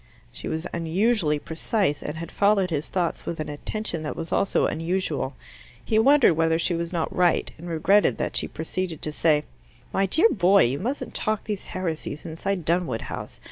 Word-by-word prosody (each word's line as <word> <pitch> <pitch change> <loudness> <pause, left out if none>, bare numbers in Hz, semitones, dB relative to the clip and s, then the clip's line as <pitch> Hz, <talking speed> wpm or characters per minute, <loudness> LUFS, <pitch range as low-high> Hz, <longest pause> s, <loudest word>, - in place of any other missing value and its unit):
She - - -7
was 160 +2 -2
unusually 170 0 +1
precise, 160 +1 -1
and 150 - -5
had 170 +1 -6
followed 200 -3 +2
his 150 -1 -2
thoughts 175 -3 -2
with 170 - -3
an 155 - -3
attention 170 +3 -4
that 150 - -4
was 165 - -6
also 195 - +2
unusual. 165 -5 -1 0.5
He 220 - +2
wondered 275 - +6
whether 160 0 +2
she 170 +2 0
was 170 0 -2
not 170 -3 -2
right, 180 -1 +2
and 175 +2 -7
regretted 190 +6 +3
that - - -2
she - - +2
proceeded 165 0 -4
to 155 - 0
say, 150 -1 +2 0.5
"My 195 0 +2
dear 330 - +4
boy, 195 0 +5
you 130 +4 0
mustn't 260 +7 -3
talk 215 -1 -1
these 210 -3 -4
heresies 160 -4 -4
inside 170 +2 -3
Dunwood 165 -9 +1
House! - - -7
170 Hz, 180 wpm, -25 LUFS, 160-195 Hz, 0.5 s, wondered